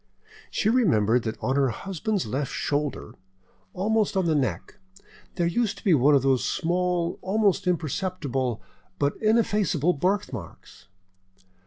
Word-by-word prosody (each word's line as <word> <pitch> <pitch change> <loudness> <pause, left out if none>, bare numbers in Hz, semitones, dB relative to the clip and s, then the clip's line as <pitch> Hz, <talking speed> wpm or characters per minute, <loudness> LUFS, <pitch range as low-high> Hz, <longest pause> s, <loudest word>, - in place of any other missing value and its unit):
She - - -1
remembered 125 - +3
that 110 0 -3
on 130 - 0
her 135 -2 +3
husband's 195 - -3
left 135 +6 -3
shoulder, 145 -6 -2 0.6
almost 210 +1 +1
on 190 - +2
the 165 - +2
neck, 145 +7 -2 0.6
there 175 - 0
used 205 +5 0
to - - -13
be 190 - +4
one 145 +1 +5
of 135 - +3
those 135 -2 +2
small, 175 0 -1
almost 200 -1 +1
imperceptible, 155 - -2 0.3
but 140 0 0
ineffaceable 210 -7 +2
birthmarks. 140 - -4
170 Hz, 130 wpm, -25 LUFS, 135-195 Hz, 0.6 s, one